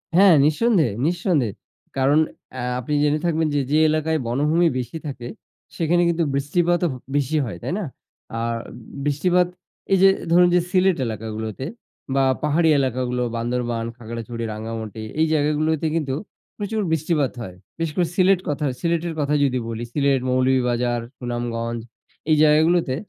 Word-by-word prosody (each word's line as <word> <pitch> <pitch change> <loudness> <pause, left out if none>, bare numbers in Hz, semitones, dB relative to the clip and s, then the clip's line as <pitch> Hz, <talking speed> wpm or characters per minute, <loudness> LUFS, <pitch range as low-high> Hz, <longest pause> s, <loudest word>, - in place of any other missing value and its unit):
হ্যাঁ। 190 -3 +7
নিঃসন্দেহে, 155 - +2
নিঃসন্দেহে। 170 - +1 0.4
কারণ 140 +3 +4 0.3
অ্যা 130 - -5 0.2
আপনি 135 +4 -4
জেনে 150 +1 +2
থাকবেন 160 -1 +1
যে, - - +3
যে 155 - +4
এলাকায় 155 0 0
বনভূমি 150 +7 +2
বেশি 125 +6 -5
থাকে 120 -4 -6 0.5
সেখানে 175 +1 +2
কিন্তু 170 0 +1
বৃষ্টিপাতও 175 +5 +1
ব - - -6 0.2
বেশি 145 +2 +1
হয়, 100 -7 -6
তাই - - -2
না? 195 - -3 0.5
আর 115 0 -1 0.5
বৃষ্টিপাত 175 +5 +2 0.4
এই 195 - +5
যে 195 - +8 0.2
ধরুন 180 +1 +6
যে, - - +5
সিলেট 185 -2 +3
এলাকাগুলোতে 110 +2 -5 0.5
বা 135 - +3 0.2
পাহাড়ি 160 +2 +3
এলাকাগুলো, 125 -1 -1
বান্দরবান, 120 -1 -2
খাগড়াছড়ি, 115 0 -6
রাঙ্গামাটি 110 0 -6 0.2
এই 160 - +4
জায়গাগুলোতে 155 +1 +1
কিন্তু 140 -5 -1 0.4
প্রচুর 215 +1 -2
বৃষ্টিপাত 155 -3 +1
হয়। 90 -5 -7 0.2
বিশেষ 165 -2 -2
করে 175 -2 +2
সিলেট 190 -1 +4
কথা 145 +1 -1
সিলেটের 170 0 -1
কথা 145 0 0
যদি 130 -2 +1
বলি। 115 0 -4
সিলেট, 140 -2 +2
মৌলভীবাজার, 125 -2 +1 0.2
সুনামগঞ্জ 120 -1 -3 0.5
এই 155 - +6
জায়গাগুলোতে 155 -2 +3
145 Hz, 145 wpm, -22 LUFS, 120-165 Hz, 0.5 s, যে